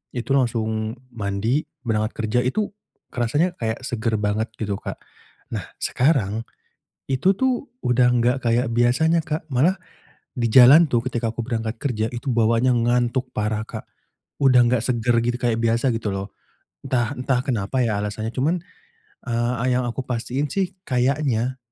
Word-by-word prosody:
itu 120 +2 -4
langsung 110 -3 0 0.2
mandi, 110 +6 -1 0.2
berangkat 110 -1 0
kerja 110 +2 0
itu 205 +12 -1 0.4
rasanya 145 +9 +1
kayak 110 0 -2
segar 115 -3 -1
banget 105 +2 0
gitu 105 -2 -2
Kak. - - -6 0.6
Nah - - -3 0.2
sekarang, 115 -6 +1 0.7
itu 135 +9 +3
tuh 260 +1 0 0.2
udah 125 0 +4
gak 125 +3 +2
kayak 120 +2 +2
biasanya 135 +8 +3
Kak, 155 +1 -3
malah 170 +10 +3 0.6
di 120 -2 0
jalan 135 +8 +8
tuh 120 -1 +2
ketika 120 -2 -1
aku 120 - -3
berangkat 115 -2 -3
kerja 110 -6 -1
itu 120 +3 -4
bawaannya 115 +2 +3
ngantuk 125 +1 +1
parah 105 0 -1
Kak - - -7 0.6
udah 130 -2 +6
nggak 120 -2 +2
segar 120 -1 +1
gitu 120 +1 0
kayak 120 -3 +1
biasa 115 +3 +2
gitu 110 -2 -2
loh. 95 +1 -4 0.5
Entah 120 0 0
entah 130 -1 0
kenapa 125 0 -1
ya 105 -3 0
alasannya 110 +2 -3
cuman, 150 +7 +1 0.7
eee, 120 +1 0
a - - -2
yang 125 0 +2
aku 130 +2 -5
pastiin 125 +3 -2
sih 190 +1 -2
kayaknya 130 -1 0
120 Hz, 150 wpm, -22 LUFS, 115-130 Hz, 0.7 s, jalan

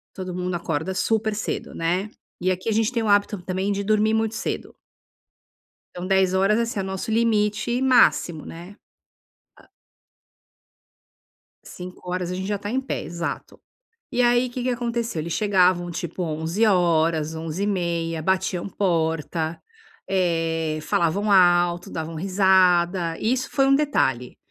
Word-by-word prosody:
todo 185 -2 -5
mundo 180 0 -3
acorda 165 +2 -3
super 220 +2 0
cedo, 215 - -4
né. 180 +5 -1 0.3
E 185 +1 +1
aqui 185 +4 -5
a - - +2
gente 225 +2 +1
tem 235 -3 0
o 220 - -1
hábito, 205 -1 +2
também, 190 +2 -2
de 200 0 -2
dormir 215 +1 +2
muito 220 0 0
cedo. - - -4 1.2
Então 180 0 -5
22h, 190 +2 +3
assim, 230 -2 -1
é - - -1
o - - -5
nosso 190 +3 -4
limite 220 +1 +1
máximo, 210 - +3
né. 175 +5 -10 0.8
Ah - - -20 1.9
5h 180 0 -6
a - - -3
gente 190 +1 -4
já 205 +1 -1
está 205 +1 -6
em 260 +3 0
pé, 270 - -4
exato. 170 -1 -6 0.5
E 250 - +1
aí, 245 +1 +3
que 245 0 -5
que 255 - 0
aconteceu? 235 -5 -2
Eles 165 +1 -4
chegavam, 185 -4 +2
tipo 170 +2 -4
23h, 165 -2 +1
23h30, 165 -1 -2
batiam 190 +1 -1
porta. 165 -3 -1 0.5
Eh, 165 -4 0
falavam 170 +7 0
alto, 175 -2 +4
davam 160 0 -5
risada. 180 -1 +2
Isso 250 +3 0
foi 270 -2 +2
um 275 - +5
detalhe. 135 - 0
185 Hz, 140 wpm, -23 LUFS, 170-215 Hz, 1.9 s, um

